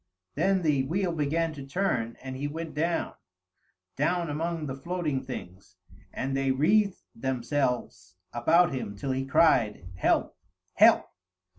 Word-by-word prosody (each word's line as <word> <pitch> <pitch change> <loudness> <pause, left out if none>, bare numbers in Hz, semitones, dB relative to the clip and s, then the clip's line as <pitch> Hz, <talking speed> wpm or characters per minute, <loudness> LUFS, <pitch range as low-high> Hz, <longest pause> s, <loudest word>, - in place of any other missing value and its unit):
Then 190 -1 +1
the 150 -4 +2
wheel 185 +2 0
began 160 +1 0
to 140 -2 -8
turn, 135 -8 -1
and 130 -1 -6
he 140 +2 -3
went 160 +2 -6
down, 165 +3 -1 0.8
down 170 +3 0
among 165 +1 -2
the 135 - -4
floating 155 -1 -2
things, 95 -7 -9 0.3
and 135 +1 -3
they 135 0 0
wreathed 190 +9 +2
themselves 125 -7 -2 0.2
about 160 +8 +3
him 105 -6 -4
till 135 +7 -3
he 135 +1 -2
cried, 120 - +3
"Help! - - +1 0.4
help!" - - +6
145 Hz, 135 wpm, -28 LUFS, 130-165 Hz, 0.8 s, help